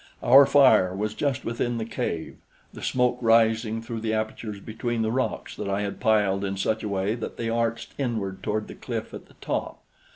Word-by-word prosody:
Our 135 Hz, +3 st, +8 dB
fire 120 Hz, -10 st, +5 dB
was 105 Hz, +2 st, -2 dB
just 140 Hz, +2 st, -2 dB
within 120 Hz, +1 st, -1 dB
the 110 Hz, -, -3 dB
cave, 115 Hz, -8 st, -4 dB, 0.4 s
the -, -, -10 dB
smoke 125 Hz, -1 st, +1 dB
rising 115 Hz, -1 st, +3 dB
through 115 Hz, 0 st, -5 dB
the 110 Hz, 0 st, -1 dB
apertures 110 Hz, -1 st, -4 dB
between 115 Hz, +2 st, -3 dB
the 110 Hz, -, 0 dB
rocks 130 Hz, +2 st, -2 dB
that -, -, -4 dB
I 100 Hz, +1 st, 0 dB
had 100 Hz, -1 st, -4 dB
piled 100 Hz, -3 st, +2 dB
in 95 Hz, 0 st, -2 dB
such 110 Hz, +3 st, 0 dB
a 105 Hz, -, -3 dB
way 100 Hz, +1 st, 0 dB
that 120 Hz, -, -6 dB
they 115 Hz, -1 st, -2 dB
arched 115 Hz, 0 st, -1 dB
inward 110 Hz, -8 st, -2 dB
toward 105 Hz, 0 st, -2 dB
the -, -, -8 dB
cliff -, -, -5 dB
at -, -, -9 dB
the -, -, -21 dB
top. -, -, -4 dB
110 Hz, 200 wpm, -25 LUFS, 105-120 Hz, 0.4 s, Our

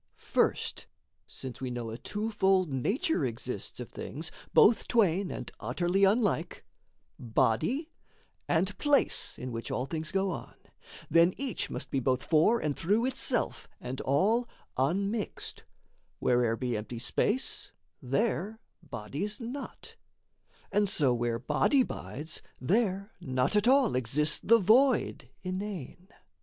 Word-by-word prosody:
First -, -, 0 dB, 0.4 s
since 130 Hz, 0 st, -8 dB
we 130 Hz, -, -2 dB
know 120 Hz, -2 st, -4 dB
a 115 Hz, -, -6 dB
twofold 195 Hz, -2 st, +1 dB
nature 215 Hz, -, 0 dB
exists, -, -, -4 dB
Of -, -, -7 dB
things, -, -, -5 dB, 0.2 s
both 235 Hz, -, +5 dB
twain 195 Hz, -5 st, +2 dB
and -, -, -6 dB
utterly 180 Hz, +3 st, +1 dB
unlike 205 Hz, -1 st, +1 dB, 0.5 s
Body, 135 Hz, -, 0 dB, 0.6 s
and 185 Hz, +4 st, +1 dB
place 290 Hz, -1 st, +2 dB
in 125 Hz, 0 st, -6 dB
which 115 Hz, 0 st, -5 dB
an 125 Hz, -, -1 dB
things 155 Hz, +2 st, -3 dB
go 195 Hz, 0 st, +1 dB
on -, -, -7 dB, 0.6 s
Then 170 Hz, +3 st, +5 dB
each 270 Hz, -3 st, -2 dB
must -, -, -6 dB
be 135 Hz, -, +1 dB
both 130 Hz, 0 st, 0 dB
for 170 Hz, +9 st, +4 dB
and 150 Hz, -2 st, -1 dB
through 210 Hz, +8 st, +1 dB
itself, 260 Hz, -2 st, +1 dB
And 125 Hz, +1 st, -5 dB
all 215 Hz, -, +2 dB, 0.3 s
unmixed: 195 Hz, -, -1 dB, 0.5 s
where'er 120 Hz, -2 st, +2 dB
be 125 Hz, -1 st, -2 dB
empty 110 Hz, +3 st, -5 dB
space, 210 Hz, -, -1 dB, 0.3 s
There 205 Hz, -, -1 dB, 0.2 s
body's 160 Hz, -, -5 dB
not; 250 Hz, +4 st, -7 dB, 0.7 s
and 205 Hz, 0 st, +2 dB
so 140 Hz, -8 st, +3 dB
where 120 Hz, -1 st, 0 dB
body 150 Hz, -, +3 dB
bides, 155 Hz, -, -5 dB, 0.2 s
There 200 Hz, -, 0 dB
not 130 Hz, +2 st, 0 dB
at 210 Hz, +2 st, +3 dB
all 265 Hz, -3 st, +5 dB
exists 145 Hz, +5 st, +2 dB
the 230 Hz, +2 st, +6 dB
void 235 Hz, +5 st, +3 dB
inane. 185 Hz, -3 st, -5 dB
185 Hz, 125 wpm, -30 LUFS, 130-220 Hz, 0.7 s, the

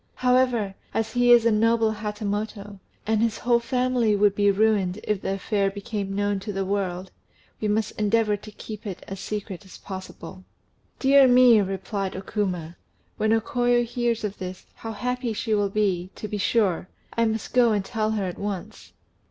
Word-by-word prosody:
However, 250 Hz, -5 st, +2 dB, 0.2 s
as 225 Hz, 0 st, 0 dB
he 245 Hz, 0 st, +4 dB
is 240 Hz, -1 st, +7 dB
a 230 Hz, -, +4 dB
noble 225 Hz, +1 st, +3 dB
Hatamoto, 210 Hz, -1 st, -4 dB, 0.3 s
and 220 Hz, 0 st, +1 dB
his 230 Hz, -1 st, +1 dB
whole 240 Hz, -1 st, +2 dB
family 250 Hz, -2 st, +1 dB
would 205 Hz, 0 st, +3 dB
be 205 Hz, 0 st, +3 dB
ruined 200 Hz, -2 st, +2 dB
if 210 Hz, -2 st, -1 dB
the 195 Hz, -, -1 dB
affair 195 Hz, 0 st, 0 dB
became 200 Hz, 0 st, -4 dB
known 205 Hz, 0 st, 0 dB
to 205 Hz, +2 st, -5 dB
the 195 Hz, -1 st, -2 dB
world, 190 Hz, -2 st, -2 dB, 0.5 s
we 215 Hz, -, -1 dB
must 215 Hz, 0 st, 0 dB
endeavour 210 Hz, 0 st, +2 dB
to 210 Hz, +1 st, -11 dB
keep 215 Hz, 0 st, -8 dB
it 190 Hz, -3 st, -7 dB
as 195 Hz, 0 st, -6 dB
secret 205 Hz, -2 st, -5 dB
as 190 Hz, -, -13 dB
possible." 185 Hz, -1 st, -9 dB, 0.5 s
"Dear 275 Hz, 0 st, +6 dB
me!" 245 Hz, -3 st, +7 dB
replied 195 Hz, 0 st, -3 dB
O 190 Hz, -, -4 dB
Kuma; 180 Hz, -5 st, -3 dB, 0.4 s
"when 215 Hz, 0 st, +1 dB
O 225 Hz, -, +4 dB
Koyo 240 Hz, +1 st, +1 dB
hears 235 Hz, -1 st, -1 dB
this, 185 Hz, -3 st, -5 dB
how 225 Hz, 0 st, -7 dB
happy 250 Hz, +2 st, -2 dB
she 220 Hz, +1 st, -2 dB
will 205 Hz, -1 st, +2 dB
be, 190 Hz, -3 st, 0 dB
to 215 Hz, -, -6 dB
be 210 Hz, 0 st, -4 dB
sure! 190 Hz, -4 st, +1 dB, 0.3 s
I 230 Hz, -, +2 dB
must 220 Hz, -1 st, -2 dB
go 245 Hz, -2 st, +5 dB
and 205 Hz, -2 st, 0 dB
tell 215 Hz, +1 st, -1 dB
her 205 Hz, -3 st, -1 dB
at 180 Hz, -, -5 dB
once." 200 Hz, -3 st, -6 dB
210 Hz, 180 wpm, -25 LUFS, 195-230 Hz, 0.5 s, is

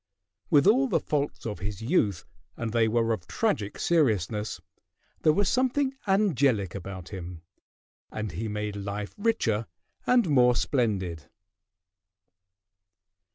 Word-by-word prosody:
With 145 Hz, +1 st, +5 dB
all 255 Hz, +7 st, +5 dB
the -, -, +2 dB
faults 145 Hz, -1 st, -2 dB
of 105 Hz, -6 st, -4 dB
his 100 Hz, +1 st, -4 dB
youth, 110 Hz, -, +1 dB, 0.3 s
and 115 Hz, -2 st, -3 dB
they 115 Hz, -1 st, +3 dB
were 115 Hz, 0 st, +2 dB
of 90 Hz, -5 st, -6 dB
tragic 100 Hz, +4 st, -1 dB
seriousness, 110 Hz, -, +1 dB, 0.6 s
there 155 Hz, -, +5 dB
was 200 Hz, +5 st, +1 dB
something 260 Hz, +3 st, +1 dB
angelic 140 Hz, -, +2 dB
about 95 Hz, -2 st, -7 dB
him, 90 Hz, -4 st, -8 dB, 0.7 s
and 110 Hz, -2 st, -4 dB
he 105 Hz, +8 st, -4 dB
made 105 Hz, 0 st, -3 dB
life 100 Hz, +1 st, -5 dB
richer 115 Hz, -, 0 dB, 0.4 s
and 245 Hz, -5 st, +4 dB
more 125 Hz, -5 st, +4 dB
splendid. 95 Hz, -, -1 dB
110 Hz, 120 wpm, -27 LUFS, 100-150 Hz, 0.7 s, With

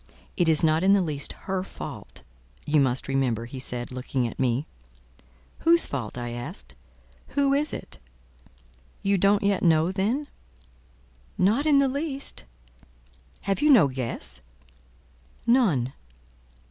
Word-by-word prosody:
"It 175 Hz, -3 st, +2 dB
is 155 Hz, 0 st, +5 dB
not 160 Hz, +1 st, +3 dB
in 195 Hz, +1 st, +5 dB
the 200 Hz, -, +4 dB
least 145 Hz, -4 st, -3 dB
her 190 Hz, -1 st, -1 dB
fault, -, -, -9 dB, 0.4 s
you 150 Hz, 0 st, +3 dB
must 130 Hz, -2 st, +1 dB
remember," 130 Hz, -4 st, 0 dB
he 130 Hz, +2 st, -8 dB
said, 125 Hz, -1 st, -5 dB
looking 130 Hz, 0 st, -2 dB
at -, -, -9 dB
me. 130 Hz, +2 st, +1 dB, 0.9 s
"Whose 335 Hz, 0 st, +5 dB
fault?" 125 Hz, -5 st, -5 dB
I 120 Hz, -1 st, -4 dB
asked. 120 Hz, -, -6 dB, 0.6 s
"Who 280 Hz, -1 st, +3 dB
is 290 Hz, +2 st, +2 dB
it?" -, -, -6 dB, 1.0 s
"You 195 Hz, -1 st, +2 dB
don't 200 Hz, +2 st, +3 dB
yet 200 Hz, -1 st, +1 dB
know, 165 Hz, 0 st, +3 dB
then?" 215 Hz, +10 st, -1 dB, 1.1 s
"Not 225 Hz, +11 st, +2 dB
in 295 Hz, -2 st, +5 dB
the 275 Hz, 0 st, +4 dB
least." 275 Hz, -, -4 dB, 1.0 s
"Have 195 Hz, +6 st, -1 dB
you 300 Hz, -, +4 dB
no 220 Hz, -, +7 dB
guess?" 120 Hz, -, -5 dB, 1.0 s
"None." 190 Hz, -, +2 dB
170 Hz, 135 wpm, -26 LUFS, -, 1.1 s, no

